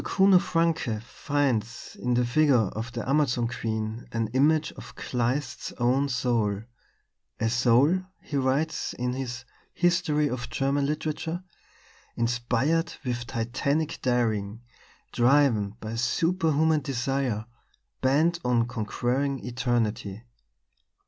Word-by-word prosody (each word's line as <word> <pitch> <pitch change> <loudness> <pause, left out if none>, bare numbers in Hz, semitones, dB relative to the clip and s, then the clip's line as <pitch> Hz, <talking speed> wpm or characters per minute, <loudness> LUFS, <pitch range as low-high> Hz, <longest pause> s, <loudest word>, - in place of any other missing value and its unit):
Kuno 190 -1 +5
Francke 165 -11 0
finds 120 -4 -2
in 125 -1 -1
the 125 0 +2
figure 145 +3 +3 0.2
of 115 +2 -4
the 120 +1 -5
Amazon 130 -4 +2
queen 110 -1 -4
an 115 -2 -1
image 150 +6 +2
of - - -12
Kleist's 125 +1 -2
own 130 +4 +1
soul 115 -5 0 0.8
"a 115 - +1
soul," 125 +8 +4 0.2
he 145 - -7
writes 140 +4 0
in 125 0 -2
his 125 -1 -5 0.3
History 170 -4 +2
of 125 -2 -4
German 140 +2 0
Literature, 155 +3 -3 0.7
"inspired 125 +8 0
with 120 -1 -2
titanic 140 +7 -1
daring, 115 -4 0 0.5
driven 120 -5 +3
by 110 +1 -6
superhuman 160 +4 +2
desire, 135 -4 -1 0.6
bent 155 +6 +3
on 120 -2 +2
conquering 125 +4 -2
Eternity. 120 -4 -1
125 Hz, 110 wpm, -27 LUFS, 120-145 Hz, 0.8 s, Kuno